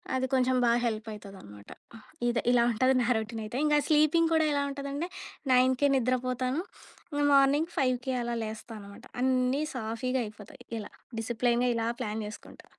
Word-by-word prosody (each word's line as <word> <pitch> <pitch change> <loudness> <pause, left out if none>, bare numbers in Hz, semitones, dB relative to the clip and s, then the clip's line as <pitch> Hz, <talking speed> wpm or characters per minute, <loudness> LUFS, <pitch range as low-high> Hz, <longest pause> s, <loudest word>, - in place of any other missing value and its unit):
అది 260 0 0
కొంచెం 260 0 +3
బాగా 235 0 +3
హెల్ప్ 215 -1 -3
అయితదనమాట. 190 - -12 0.6
ఇదే 235 -1 0
ఇలా 240 -1 +4
ఉంటది 255 +4 +3
నా 235 - 0
రోటీన్ 220 +1 -4
అయితే. 230 +4 -5
ఇంగ 300 -1 +3
స్లీపింగ్ 310 +2 +4
కూడా 315 -1 +3
ఎలా 285 0 +1
ఉంటదంటే, 280 +4 -4 0.4
9కే 255 +2 +4
నిద్రపోతాను. 255 +3 0 0.7
మార్నింగ్ 280 +4 +4
5కి 255 -1 0
అలా 235 0 -2
లేస్తా 220 +1 -7
అన్నమాట. 200 0 -12 0.2
అన్నీ 255 +2 +2
సాఫీగా 250 +2 -2
అయిపోతాయి. 245 +5 -12 0.2
ఇలా 205 - -8 0.3
డిసిప్లైన్‌గా 240 +2 +1
ఇలా 230 0 -1
ప్లాన్ 220 -2 -3
చేసుకుంటా. 210 - -11
250 Hz, 145 wpm, -29 LUFS, 225-270 Hz, 0.7 s, ఇలా